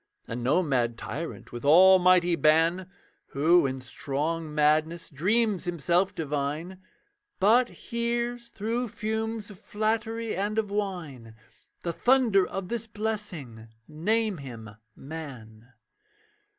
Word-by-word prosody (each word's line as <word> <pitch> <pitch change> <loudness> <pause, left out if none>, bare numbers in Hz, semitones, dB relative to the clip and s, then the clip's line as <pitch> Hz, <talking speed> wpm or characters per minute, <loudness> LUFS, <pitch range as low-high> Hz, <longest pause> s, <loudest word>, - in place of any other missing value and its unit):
And 120 +1 -5
no 145 +9 +3
mad 120 -6 0
tyrant, 165 +7 -6
with 120 -1 -7
almighty 180 +2 +6
ban, 165 +4 +2 0.5
Who 160 +2 +4
in 130 0 -4
strong 150 +5 -3
madness 155 +3 +1
dreams 200 +5 +1
himself 175 +2 0
divine, 150 +4 -3 0.6
But 235 +5 +4
hears 235 0 -3
through 230 +3 -2
fumes 220 0 -4
of 190 - -14
flattery 225 +1 -2
and 205 +3 -2
of 210 -2 -1
wine 165 - -4 0.5
The 170 - -2
thunder 235 -5 +3
of 190 -1 -5
this 235 -1 -3
blessing 195 - -5 0.2
name 210 +6 0
him 115 -6 -9 0.2
man. 130 -7 -10
175 Hz, 110 wpm, -27 LUFS, 145-215 Hz, 0.6 s, almighty